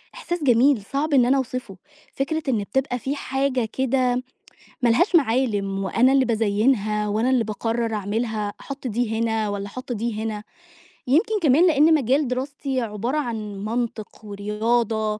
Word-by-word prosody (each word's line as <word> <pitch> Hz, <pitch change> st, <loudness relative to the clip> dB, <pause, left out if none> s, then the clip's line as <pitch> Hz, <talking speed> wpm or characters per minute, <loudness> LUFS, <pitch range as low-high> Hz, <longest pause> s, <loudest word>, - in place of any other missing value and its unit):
إحساس 350 Hz, -10 st, -4 dB
جميل، 250 Hz, -1 st, +4 dB
صعب 285 Hz, +8 st, -2 dB
إن 250 Hz, -3 st, +5 dB
أنا 270 Hz, +2 st, +3 dB
أوصفه. 250 Hz, -7 st, -4 dB, 0.4 s
فكرة 310 Hz, +3 st, -2 dB
إن 220 Hz, -5 st, +1 dB
بتبقى 250 Hz, +4 st, -1 dB
في 275 Hz, +4 st, -3 dB
حاجة 270 Hz, -3 st, -1 dB
كده 255 Hz, -1 st, +1 dB, 0.6 s
ما 240 Hz, -, +3 dB
لهاش 350 Hz, -, +3 dB
معالِم 220 Hz, -8 st, +1 dB
وأنا 250 Hz, +7 st, +3 dB
اللي 270 Hz, -1 st, +4 dB
بازيّنها 215 Hz, -1 st, +1 dB
وأنا 220 Hz, +5 st, 0 dB
اللي 250 Hz, -3 st, +3 dB
باقرّر 225 Hz, +2 st, -2 dB
أعملها، 210 Hz, 0 st, -2 dB
أحُط 275 Hz, -2 st, -6 dB
دي 225 Hz, 0 st, -1 dB
هنا 225 Hz, -2 st, 0 dB
والّا 200 Hz, 0 st, -4 dB
أحُط 255 Hz, +4 st, -8 dB
دي 220 Hz, 0 st, -3 dB
هنا. 215 Hz, -1 st, -4 dB, 0.6 s
يمكن 420 Hz, -, +2 dB
كمان 315 Hz, +4 st, +5 dB
لإن 310 Hz, +1 st, +5 dB
مجال 270 Hz, +1 st, +1 dB
دراستي 265 Hz, +1 st, -3 dB
عبارة 230 Hz, +6 st, -2 dB
عن 215 Hz, -6 st, -4 dB
منطق 225 Hz, -2 st, -4 dB
ورياضة 215 Hz, +1 st, -1 dB
240 Hz, 150 wpm, -23 LUFS, 215-270 Hz, 0.6 s, إن